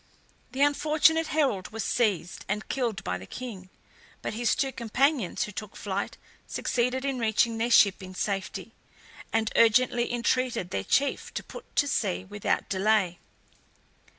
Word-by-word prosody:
The 270 +2 +2
unfortunate 310 +2 +3
herald 270 -13 +1
was 225 +1 -4
seized 200 -7 0
and 210 +2 -2
killed 235 -6 -1
by 90 0 -2
the 95 - -11
king; 210 -7 -8 0.5
but - - -3
his 235 +1 +1
two 270 - 0
companions, 255 - +1
who 210 - -5
took 210 0 -7
to - - -11
flight, 200 -1 -3 0.3
succeeded 250 +2 -1
in 270 -2 -1
reaching 225 0 +2
their 235 +2 +1
ship 200 -4 +5
in 185 0 -9
safety, 195 0 -3 0.6
and 220 -1 +1
urgently 240 +1 +4
entreated 240 -5 0
their 95 - -2
chief 275 - +1
to - - -3
put - - -12
to 285 - +3
sea 190 -8 -1
without 205 +1 -1
delay. 195 -2 +1
225 Hz, 150 wpm, -27 LUFS, 195-255 Hz, 0.6 s, ship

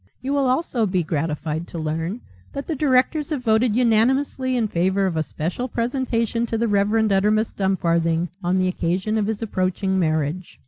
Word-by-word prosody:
You 270 +3 -3
will 280 -2 +2
also 255 -5 0
be 185 -2 0
gratified 155 +1 -2
to - - -8
learn 165 +7 -3 0.3
that 280 - -5
the 325 - -2
directors 285 +1 +2
have 290 -5 -3
voted 220 -1 +2
unanimously 255 +2 +2
in 225 -3 +1
favour 190 +2 +1
of 185 -3 -1
a 160 - +1
special 175 +10 -3
presentation 235 -1 -1
to 225 - -2
the 230 +1 +1
Rev. 200 -1 +2 0.2
Uttermust 210 +3 +1
Dumfarthing 170 -3 +1
on 180 +2 +1
the 185 0 +2
occasion 185 +4 -1
of 205 - 0
his 220 0 -2
approaching 190 -1 -1
marriage. 160 +1 -1
205 Hz, 175 wpm, -22 LUFS, 175-245 Hz, 0.3 s, will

